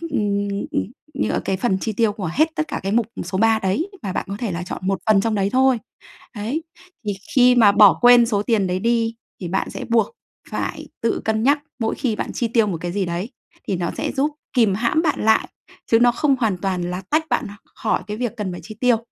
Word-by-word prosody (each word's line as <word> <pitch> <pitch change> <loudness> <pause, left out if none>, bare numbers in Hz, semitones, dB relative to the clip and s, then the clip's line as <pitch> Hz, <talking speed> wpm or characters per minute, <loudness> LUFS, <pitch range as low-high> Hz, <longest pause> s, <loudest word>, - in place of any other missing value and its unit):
ừm, 205 -11 -1 0.7
như - - -1
ở - - 0
cái 195 - 0
phần 190 -1 0
chi 220 - -2
tiêu 220 0 +2
của 190 -5 -4
hết 310 - +3
tất 310 - -2
cả - - -3
cái 195 +1 -2
mục 230 -1 +2 0.2
số 185 - -3
3 225 +1 +4
đấy, 210 - -1
mà 195 -3 -3
bạn - - -2
có 200 - -4
thể 225 -5 -2
là 170 +1 -3
chọn 180 - -5
một 195 0 +1
phần 215 -2 +5
trong 225 +2 0
đấy 200 -1 +1
thôi. 260 0 +3 0.6
Đấy. 235 +10 -3 0.4
Thì 205 - +1 0.2
khi 250 -1 +6
mà 220 -4 +6
bỏ 205 -1 +7
quên 245 -1 +7
số 210 -3 0
tiền 210 -4 +1
đấy 180 0 -1
đi 230 +1 +1 0.3
thì 175 - -3
bạn 190 +3 -1
sẽ - - -6
buộc 230 -1 +3 0.4
phải - - -4
tự 230 - 0
cân 220 0 +1
nhắc 285 +4 +4 0.2
mỗi 225 -2 -1
khi 235 -5 -1
bạn - - -4
chi 235 - -1
tiêu 225 -1 +2
một 185 -5 -2
cái 175 - -3
gì 195 +1 -1
đấy, 175 +5 -3 0.4
thì 195 - 0
nó 170 -1 -2
sẽ - - -2
giúp 285 +2 0 0.2
kìm 225 -6 +3
hãm 235 +9 +1
bạn 310 -3 0
lại, 220 0 +3 0.4
chứ 225 - +6
nó 240 0 +5
không 275 +1 +2
hoàn 215 -7 +1
toàn 185 -1 -2
là 180 +1 -4
tách 315 +1 +2
bạn 235 - 0
h - - -9 0.2
khỏi - - -1
cái 210 0 -4
việc 240 -2 -3
cần 205 -3 -3
phải 175 - -7
chi 215 - -9
tiêu. 245 -2 +4
220 Hz, 245 wpm, -21 LUFS, 195-245 Hz, 0.7 s, bỏ